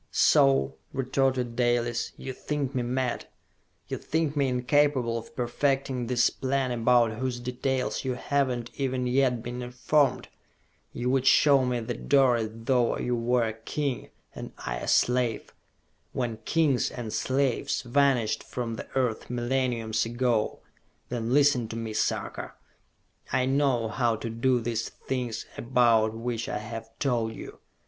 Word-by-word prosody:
"So," 65 0 +4 0.2
retorted 130 -2 0
Dalis, 120 -1 0
"you 130 - -6
think 145 0 -3
me 130 - 0
mad? 125 +1 -2 0.6
You - - -4
think 160 -2 -1
me 140 -2 +2
incapable 130 -1 +2
of 115 -1 -7
perfecting 130 0 0
this 120 -1 +3
plan 135 -1 -1
about 120 -1 +3
whose 130 -2 -2
details 125 +1 -2
you 130 -2 -1
have 140 +2 +1
not 120 -2 -4
even 130 -2 -1
yet 125 -2 +2
been 120 +1 -5
informed! 125 +4 +1 0.6
You 125 +1 -2
would 135 0 +1
show 140 -1 +6
me 125 -1 -1
the 120 +2 -3
door 135 -1 +3
as 110 -1 -2
though 120 +2 +1
you 125 - -1
were 120 +1 +1
a 110 -1 -1
king 125 +3 -3 0.2
and - - -7
I - - -4
a - - -6
slave 125 -2 +1 0.6
when 120 -3 -2
kings 150 -6 +2
and 115 -3 -6
slaves 130 -2 0
vanished 125 -3 +2
from 115 -2 -5
the - - -7
earth 125 -4 -1
millenniums 120 -3 0
ago! 120 -1 0 0.5
Then 120 -1 -2
listen 140 -4 +4
to 110 - -7
me, 115 -1 -4
Sarka! - - -2 0.8
I 130 0 +2
know 135 -4 +2
how 115 0 +1
to 115 +1 -5
do 120 +2 +1
this 115 0 -2
thing 125 -3 -4 0.3
about 115 -3 +3
which 115 0 -3
I - - -2
have 110 +1 -7
told 115 -5 0
you. - - -9
125 Hz, 150 wpm, -27 LUFS, 115-130 Hz, 0.8 s, show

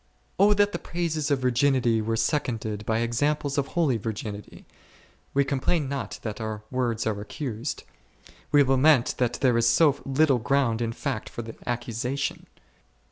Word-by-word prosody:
O 205 +1 +6
that 205 0 +3
the - - -4
praises 160 -4 -2
of 140 - +3
virginity 125 -2 +2
were 115 +1 -1
seconded 110 -7 -1
by 110 0 +1
examples 140 +4 0
of 140 - -1
holy 155 -9 +1
virginity! 105 -1 -6 0.7
We 140 0 +3
complain 140 +3 0
not 140 -1 -4
that 110 0 -5
our 110 -1 -4
words 120 -3 -1
are 105 -2 -1
accused; 120 +3 -5 0.7
we 145 -1 +6
lament 135 0 +4
that 120 -1 +1
there 125 -3 +3
is 115 0 +4
so 145 +3 +4
little 135 -1 +2
ground 120 -2 +1
in 115 -1 -1
fact 125 -1 -4
for 120 - -6
the 115 0 -8 0.2
accusation. 120 +3 -3
130 Hz, 155 wpm, -26 LUFS, 115-145 Hz, 0.7 s, O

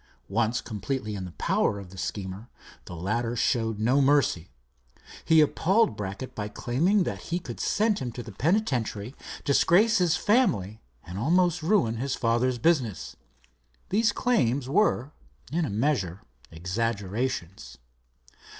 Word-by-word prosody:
Once 115 +4 0
completely 110 +1 -4
in 95 -2 -5
the 90 - -8
power 100 - 0
of 95 -3 -10
the 95 - -12
schemer, 95 +5 -5 0.4
the 90 - -8
latter 115 +7 -2
showed 115 -3 0
no 125 +6 +2
mercy. 135 - +2 0.7
He 160 -1 +5
appalled 180 - +2
Brackett 100 +5 -6
by 105 -1 -4
claiming 160 - +1
that - - -5
he 170 - 0
could 180 - -7
send 215 0 +1
him 125 - -4
to 120 - -6
the 110 - -9
penitentiary, 125 - -1 0.3
disgrace 190 +10 +4
his 175 -2 +2
family, 110 - +1 0.2
and 90 +4 -7
almost 175 - +2
ruin 155 - +2
his 135 +3 -2
father's 120 +1 +1
business. 130 - 0 0.7
These 220 +2 +3
claims 140 - +1
were, 145 -4 +1 0.4
in 165 +1 0
a - - -3
measure, 100 - -1 0.3
exaggerations. 100 - -3
120 Hz, 135 wpm, -27 LUFS, 105-160 Hz, 0.7 s, He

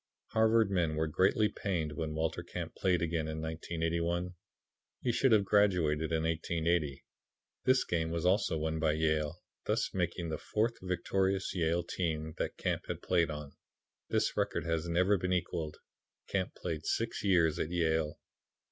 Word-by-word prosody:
Harvard 110 -1 +3
men 85 -5 +1
were 80 +1 +1
greatly 95 +7 +3
pained 85 -8 -2
when 75 +1 -3
Walter 80 0 -1
Camp - - -6
played 90 -3 +1
again 80 -1 -1
in 80 0 -4
1881. 85 +2 -2 0.7
He 120 - 0
should 130 +2 +3
have 105 -3 +5
graduated 85 -7 +3
in 80 -1 +1
1880. 80 -2 0 0.6
This 130 0 +4
game 80 -2 -1
was 85 +1 -2
also 90 -3 +3
won 80 +1 -1
by 80 -1 +2
Yale, 80 +1 0 0.2
thus - - 0
making 85 -1 -1
the 80 - -3
fourth 115 +2 0
victorious 95 +1 0
Yale 85 -1 +1
team 80 -3 -2
that - - -2
Camp - - -1 0.2
played 85 -3 +2
on. 75 -2 -6 0.6
This - - +1
record - - 0
has 80 0 -1
never 90 +4 +3
been 90 +1 -1
equalled. 80 -3 -2 0.5
Camp 95 -2 -2
played 80 -3 -4
six 115 0 -1
years 85 -6 +3
at 75 - -1
Yale. 80 -3 0
85 Hz, 155 wpm, -32 LUFS, 80-95 Hz, 0.7 s, have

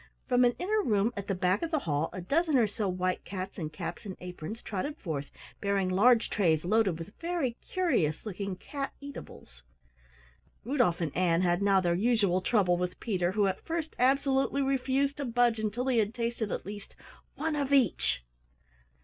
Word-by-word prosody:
From 250 -1 +4
an 245 0 +3
inner 425 +4 +1
room 220 - +1
at 200 -1 -5
the 195 - 0
back 185 +3 +1
of 335 - -2
the 315 - +1
hall 160 - -1
a 185 - -6
dozen 305 - +2
or 235 - +5
so 205 -1 -2
white 185 0 -1
cats 190 0 -6
in 155 -3 -3
caps 155 - -6
and 195 -4 -7
aprons 180 +4 -7
trotted 250 +10 -3
forth 145 -6 -4 0.3
bearing 200 -2 +1
large 225 +5 +4
trays 165 -6 +2
loaded 200 -3 +2
with 165 +5 -8
very 330 -8 -1
curious 275 - 0
looking 195 -2 -4
cat 275 +8 -5
eatables. 70 - -11 1.0
Rudolf 245 -9 +1
and 155 -4 -2
Ann 175 -1 +2
had 175 +1 +2
now 200 -1 +4
their 175 -1 +1
usual 200 -2 +2
trouble 185 -3 +2
with 180 0 -3
Peter 185 -5 0
who 205 0 +2
at 190 -1 -1
first 325 -1 -3
absolutely 270 +1 +2
refused 270 +1 +1
to 285 - -3
budge 240 -1 +2
until 220 +3 -2
he 255 -3 +2
had 215 +1 0
tasted 230 -3 -2
at - - -3
least 205 +1 -8 0.4
"one 310 +1 -1
of 280 -2 -1
each". 245 - +2
210 Hz, 185 wpm, -30 LUFS, 180-265 Hz, 1.0 s, or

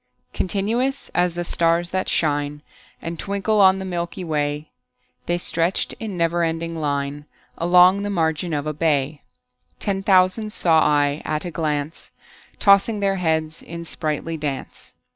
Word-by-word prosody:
Continuous 230 +9 -1
as 175 -1 0
the 175 - -2
stars 170 0 +1
that 185 0 -1
shine 145 -1 0 0.4
And 165 0 -5
twinkle 200 +1 0
on 190 0 +6
the 190 - -5
milky 175 0 -4
way, 150 -2 -2 0.6
The 175 - +1
stretched 170 +1 0
in 215 -5 -5
never 170 0 +1
ending 165 0 -2
line 145 -1 -2 0.3
Along 180 +3 +5
the 205 - -3
margin 165 -2 0
of 145 -1 -2
a 155 - -2
bay: 150 -2 0 0.6
Ten 195 -2 -1
thousand 195 +3 +3
saw 165 -2 +3
I 145 0 +2
at 155 +2 -2
a 175 - -4
glance, 150 -1 -3 0.5
Tossing 200 +2 +4
their 195 -1 +1
heads 160 -2 -1
in 170 0 -8
sprightly 160 +1 -3
dance. 145 -3 -6
170 Hz, 145 wpm, -22 LUFS, 155-190 Hz, 0.6 s, on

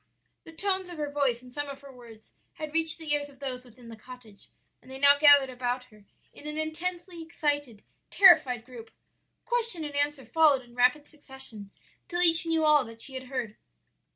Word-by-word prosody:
"The - - -12
tones 375 +2 -1
of 350 - -9
her 295 -1 -4
voice 265 -4 -1
and 250 - -14
some 290 +2 -5
of 275 0 -9
her 280 -1 -13
words 230 -3 -16 0.2
had 310 -1 -8
reached 325 0 0
the 315 -3 -3
ears 290 -1 -2
of 275 - -19
those 255 -2 -6
within 245 -1 -17
the 225 - -9
cottage, 225 -2 -15 0.3
and - - -19
they 265 - -7
now 285 +1 +6
gathered 285 -3 +6
about 250 0 -3
her 210 -1 -20 0.3
in 295 - -12
an 300 0 -6
intensely 340 +2 -4
excited, 290 -8 -3 0.3
terrified 300 - +5
group. 240 -3 -12 0.6
Question 465 -9 +1
and 290 -1 -8
answer 290 -2 -1
followed 285 +1 +3
in 240 -1 -20
rapid 250 +4 +2
succession 265 -9 -8 0.4
till 350 0 -1
each 330 -1 +4
knew 325 -1 +1
all 300 -2 +4
that 230 0 -12
she 265 - 0
had 260 0 -7
heard. 250 -5 -5
285 Hz, 195 wpm, -27 LUFS, 250-315 Hz, 0.6 s, now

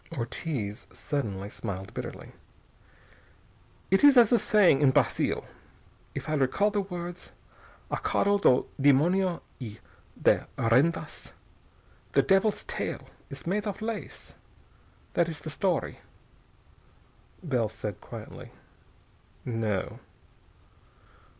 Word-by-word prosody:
Ortiz 115 - -4
suddenly 100 -9 -3
smiled 95 -2 -6
bitterly. - - -7 1.6
"It 195 - +4
is 285 -2 +8
a 235 0 +6
saying 185 -10 +4
in 140 - +6
Brazil, 130 - +1 0.7
if - - -5
I 155 - -1
recall 155 +9 +2
the 205 0 +1
words, 175 -2 -7 0.6
'A - - 0
cauda 200 0 +2
do 125 - +4
demonio 170 +6 +3 0.2
e 110 -5 -7 0.4
de - - +3
rendas.' 130 +10 +1 0.8
'The - - +5
devil's 195 +2 +2
tail - - -4 0.2
is 140 - -9
made 205 +5 -1
of 200 - -4
lace.' 220 0 -6 0.8
That 170 -1 +2
is 160 - -6
the 155 - -6
story." 180 +2 -1 1.4
Bell 125 -9 0
said 105 -2 -6
quietly: - - -9 1.0
"No." 110 -5 -2
155 Hz, 105 wpm, -28 LUFS, 120-195 Hz, 1.6 s, is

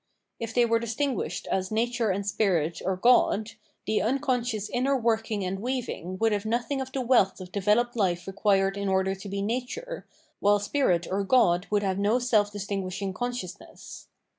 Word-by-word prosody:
If 230 -1 -5
they 240 -1 +5
were 230 0 +2
distinguished 240 +4 -2
as 190 0 0
Nature 235 +1 0
and 195 +1 -1
Spirit 180 -6 0
or 190 0 0
God, 225 -1 +3 0.3
the 215 - +1
unconscious 245 -4 0
inner 270 +3 +1
working 225 -4 0
and 190 +1 -3
weaving 240 -6 -4
would 225 +2 +2
have 205 -1 0
nothing 240 +5 -1
of 265 0 -6
the 265 - -2
wealth 235 -7 +3
of 185 -1 -9
developed 210 +5 +1
life 180 -5 0
required 195 0 +1
in 200 -1 -2
order 190 0 +1
to 195 +1 -8
be 200 0 -2
nature, 255 - -4 0.3
while 205 +1 +4
Spirit 200 -5 +1
or 200 +1 0
God 190 -5 +3
would 205 -1 +1
have 190 -1 -1
no 205 +4 +2
self 220 -5 +2
distinguishing 195 -1 -4
consciousness. 245 -4 -7
210 Hz, 170 wpm, -27 LUFS, 195-240 Hz, 0.3 s, they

